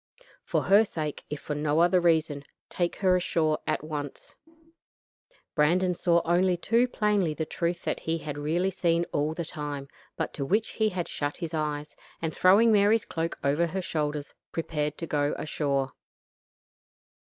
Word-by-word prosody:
For - - 0
her 200 +3 +6
sake, 155 -8 -4
if 150 - -4
for 150 - -4
no 150 +1 +1
other 175 +1 +4
reason, 160 -4 +2 0.3
take 175 -1 -1
her 185 -2 +3
ashore 160 -3 +1
at 155 - 0
once." 145 -3 -6 1.2
Brandon 180 +5 +3
saw 170 -1 +2
only 175 +1 +3
too 235 +7 +2
plainly 205 -9 +1
the 160 - -2
truth 170 +2 -2
that - - -1
he 165 +1 -1
had 150 -3 -5
really 165 +6 0
seen 170 -2 +1
all 150 +2 0
the 170 - -3
time, 145 -3 -5 0.3
but - - -2
to 140 - -3
which 210 +10 +1
he 220 -1 +1
had 180 -3 -3
shut 145 0 -3
his 165 -2 -5
eyes, 150 -1 -3 0.2
and 160 -1 -2
throwing 205 +5 +6
Mary's 210 +1 +4
cloak 165 0 -3
over 145 +5 +2
her 190 +3 -3
shoulders, 150 -3 -2 0.2
prepared 150 -2 -2
to 165 - -4
go 145 -2 0
ashore. 140 -3 -1
165 Hz, 165 wpm, -27 LUFS, 150-180 Hz, 1.2 s, her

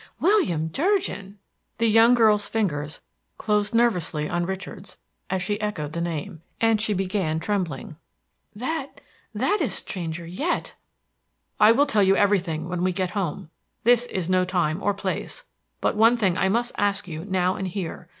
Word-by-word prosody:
"William 310 - +2
Durgin!" 280 - -1 0.4
The 230 - +1
young 225 +2 +6
girl's 215 -3 +4
fingers 150 -9 -2 0.4
closed 210 0 0
nervously 180 -10 +1
on 175 0 -1
Richard's 190 0 -6 0.3
as 190 -1 -1
she 205 +2 -2
echoed 155 -8 -3
the 170 - -2
name, 160 -2 -4 0.2
and 225 -2 +3
she 215 -1 +1
began 185 -4 -1
trembling. 165 -6 -3 0.6
"That 270 +5 -4 0.4
that 415 -1 +1
is 245 - 0
stranger 170 -2 -5
yet!" 285 - -2 0.9
"I 210 +1 +7
will 275 +5 +4
tell 220 -7 +2
you 195 0 +4
everything 175 -6 +1
when 180 0 -3
we 185 - +2
get 185 -1 -1
home; 175 -5 -3 0.3
this 245 +1 +4
is 185 -7 -3
no 185 0 +3
time 180 -2 0
or 205 -1 +1
place; 200 - -4 0.4
but - - +1
one 225 +3 +5
thing 195 -6 +1
I 190 +1 +1
must 240 +4 0
ask 205 -1 0
you 160 -2 -6
now 185 -1 0
and 190 - -3
here. 175 -2 -5
195 Hz, 160 wpm, -24 LUFS, 175-220 Hz, 0.9 s, I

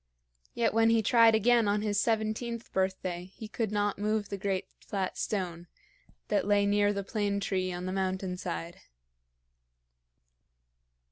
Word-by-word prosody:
Yet 235 - +1
when 225 0 +4
he 225 -1 +3
tried 230 0 +6
again 230 0 +4
on 205 +1 +1
his 205 -1 +1
seventeenth 225 +1 -2
birthday, 190 -2 -1
he 220 - -8
could 220 -1 -2
not 205 -1 0
move 210 0 -1
the 200 - -4
great 195 -1 -1
flat 195 -2 -3
stone 175 -4 -3 0.6
that - - +1
lay 205 -1 +3
near 205 0 +3
the 200 -1 -3
plane 200 0 -1
tree 185 -2 -1
on 180 0 -5
the 185 - -2
mountain 190 -1 -2
side. 170 -1 -5
205 Hz, 145 wpm, -30 LUFS, 190-220 Hz, 0.6 s, tried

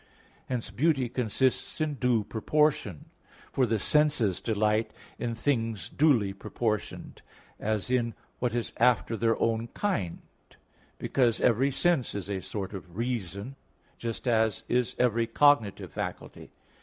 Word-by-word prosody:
Hence 125 -3 -3
beauty 135 -3 +2
consists 125 +4 0
in 155 -1 0
due 125 -5 +1
proportion; 110 - 0 0.4
for 130 -2 +2
the 115 0 +1
senses 135 - +2
delight 110 0 +1 0.3
in 120 -1 -2
things 115 -4 -1
duly 125 -10 +3
proportioned, 105 +1 -3 0.4
as 110 +2 -1
in 120 -2 +1 0.2
what 120 -2 0
is 120 - -2
after 120 -1 +3
their 115 0 +1
own 115 0 +1
kind 115 - -2 0.8
because 120 -4 +1
even 125 +4 +3
sense 135 -4 +1
is 100 0 -4
a 95 -2 -2
sort 100 0 -5
of 90 -1 -9
reason, 115 0 -3 0.4
just 115 +2 -4
as 110 -3 +2
is 125 0 +1
every 115 -2 +2
cognitive 120 -4 +3
faculty. - - -6
115 Hz, 130 wpm, -28 LUFS, 110-130 Hz, 0.8 s, duly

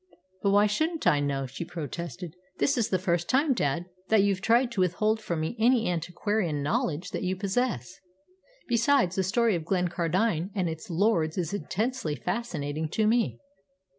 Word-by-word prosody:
"But 200 - +2
why 205 +1 +5
shouldn't 315 +10 -1
I 145 - +4
know?" 140 -1 -1
she 130 +6 -6
protested. 170 +1 -6 0.2
"This 285 - +2
is 235 -5 0
the 185 - +2
first 175 -2 -1
time, 275 +2 +3
dad, 170 - -1 0.2
that 220 -3 +5
you've 195 -2 +1
tried 235 +4 +3
to 210 -5 -1
withhold 215 +5 +1
from 170 -6 -2
me 160 +8 -2
any 235 0 +3
antiquarian 175 -1 -1
knowledge 155 +3 -1
that - - -3
you 185 0 -1
possess. 195 - -2 0.7
Besides, 235 -5 +3
the 190 - +2
story 225 +4 +2
of 170 -3 -2
Glencardine 180 +1 0
and 185 -3 0
its 160 +1 -6
lords 170 -3 +1
is 175 0 -2
intensely 205 - -2
fascinating 160 -7 -3
to 215 +6 +1
me." 215 - +2
185 Hz, 165 wpm, -27 LUFS, 165-220 Hz, 0.7 s, why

